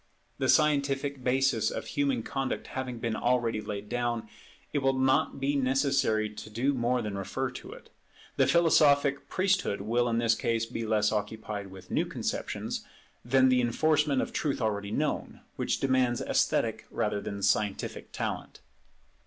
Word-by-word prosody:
The -, -, 0 dB
scientific 140 Hz, -2 st, +2 dB
basis 125 Hz, -3 st, +2 dB
of -, -, -5 dB
human 140 Hz, -5 st, 0 dB
conduct 135 Hz, +2 st, -3 dB
having 130 Hz, -2 st, -4 dB
been 115 Hz, -1 st, -2 dB
already 120 Hz, -3 st, +1 dB
laid 105 Hz, -1 st, -5 dB
down, 120 Hz, -1 st, -2 dB, 0.5 s
it 145 Hz, -, +2 dB
will 135 Hz, -1 st, +1 dB
not 130 Hz, +1 st, +2 dB
be 140 Hz, +2 st, 0 dB
necessary 135 Hz, -4 st, +2 dB
to 105 Hz, 0 st, -9 dB
do 125 Hz, +6 st, 0 dB
more 125 Hz, -1 st, 0 dB
than 100 Hz, -2 st, -4 dB
refer 95 Hz, -, -3 dB
to -, -, -9 dB
it. -, -, -15 dB, 0.4 s
The 135 Hz, -, +3 dB
philosophic 145 Hz, -3 st, +4 dB
priesthood 185 Hz, -, +1 dB
will 120 Hz, +4 st, +1 dB
in 115 Hz, -, 0 dB
this 115 Hz, -1 st, +3 dB
case 115 Hz, 0 st, 0 dB
be 115 Hz, -1 st, -5 dB
less 105 Hz, -1 st, +2 dB
occupied 105 Hz, -1 st, -3 dB
with 95 Hz, -1 st, -13 dB
new -, -, +1 dB
conceptions, -, -, -3 dB, 0.4 s
than 130 Hz, +2 st, +3 dB
with 130 Hz, -, +6 dB
the 125 Hz, -1 st, +4 dB
enforcement 145 Hz, +3 st, +2 dB
of -, -, -7 dB
truth 140 Hz, -2 st, -1 dB
already 100 Hz, -3 st, -1 dB
known, 145 Hz, +7 st, -2 dB
which -, -, -1 dB
demands 130 Hz, -3 st, +2 dB
esthetic -, -, 0 dB
rather 105 Hz, -1 st, -1 dB
than 100 Hz, -1 st, -5 dB
scientific 105 Hz, 0 st, 0 dB
talent. -, -, -4 dB
125 Hz, 160 wpm, -29 LUFS, 110-135 Hz, 0.5 s, with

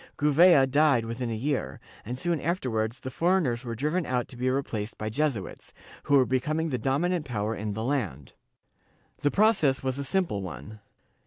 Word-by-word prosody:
Gouvea 150 Hz, 0 st, +6 dB
died 140 Hz, -3 st, +3 dB
within 115 Hz, +1 st, -4 dB
a 115 Hz, -, -2 dB
year, 125 Hz, -, -2 dB, 0.2 s
and 125 Hz, +4 st, -5 dB
soon 170 Hz, +2 st, -1 dB
afterwards 120 Hz, -9 st, -2 dB
the 130 Hz, -, -6 dB
foreigners 165 Hz, -7 st, +1 dB
were 115 Hz, -2 st, -5 dB
driven 150 Hz, +9 st, 0 dB
out 125 Hz, -1 st, -1 dB
to -, -, -12 dB
be 125 Hz, +1 st, -1 dB
replaced 115 Hz, -5 st, -3 dB
by 110 Hz, 0 st, -4 dB
Jesuits, 135 Hz, -6 st, -3 dB, 0.3 s
who 145 Hz, -, +4 dB
were 130 Hz, -, +4 dB
becoming 155 Hz, +6 st, -1 dB
the 125 Hz, -4 st, -2 dB
dominant 155 Hz, +8 st, 0 dB
power 110 Hz, -5 st, -2 dB
in 105 Hz, -1 st, -4 dB
the 110 Hz, +2 st, -4 dB
land. 105 Hz, -, -3 dB, 0.9 s
The 145 Hz, -, +2 dB
process 190 Hz, -10 st, +3 dB
was 130 Hz, +1 st, -2 dB
a -, -, -2 dB
simple 165 Hz, -, 0 dB
one. 95 Hz, -, -8 dB
130 Hz, 175 wpm, -27 LUFS, 115-150 Hz, 0.9 s, Gouvea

